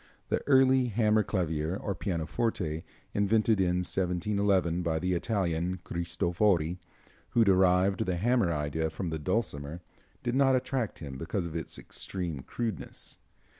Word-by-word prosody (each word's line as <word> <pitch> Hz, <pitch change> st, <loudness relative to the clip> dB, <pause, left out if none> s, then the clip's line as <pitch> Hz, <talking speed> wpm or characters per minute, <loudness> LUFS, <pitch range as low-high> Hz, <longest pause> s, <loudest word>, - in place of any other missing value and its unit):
The -, -, +1 dB
early 130 Hz, -2 st, +5 dB
hammer 110 Hz, -1 st, +3 dB
clavier, 85 Hz, -4 st, -1 dB
or 100 Hz, -, -3 dB
pianoforte, 85 Hz, -2 st, -2 dB, 0.3 s
invented 110 Hz, +1 st, +3 dB
in 90 Hz, -1 st, +2 dB
1711, 95 Hz, -1 st, +1 dB
by 80 Hz, -2 st, 0 dB
the 90 Hz, +3 st, 0 dB
Italian 90 Hz, -2 st, 0 dB
Cristofori, 85 Hz, 0 st, 0 dB, 0.6 s
who 115 Hz, -, +7 dB
derived 95 Hz, -1 st, +3 dB
the 90 Hz, -, +1 dB
hammer 115 Hz, -2 st, +2 dB
idea 80 Hz, +1 st, -1 dB
from 80 Hz, +2 st, -4 dB
the 80 Hz, -, -2 dB
dulcimer, 85 Hz, -4 st, -2 dB, 0.4 s
did 120 Hz, -, -1 dB
not 135 Hz, 0 st, +4 dB
attract 130 Hz, -3 st, -1 dB
him 70 Hz, -4 st, -7 dB
because 85 Hz, +4 st, -2 dB
of 85 Hz, -1 st, -6 dB
its 80 Hz, -, -4 dB
extreme 85 Hz, -6 st, -4 dB
crudeness. 115 Hz, -, -5 dB
90 Hz, 130 wpm, -29 LUFS, 85-105 Hz, 0.6 s, who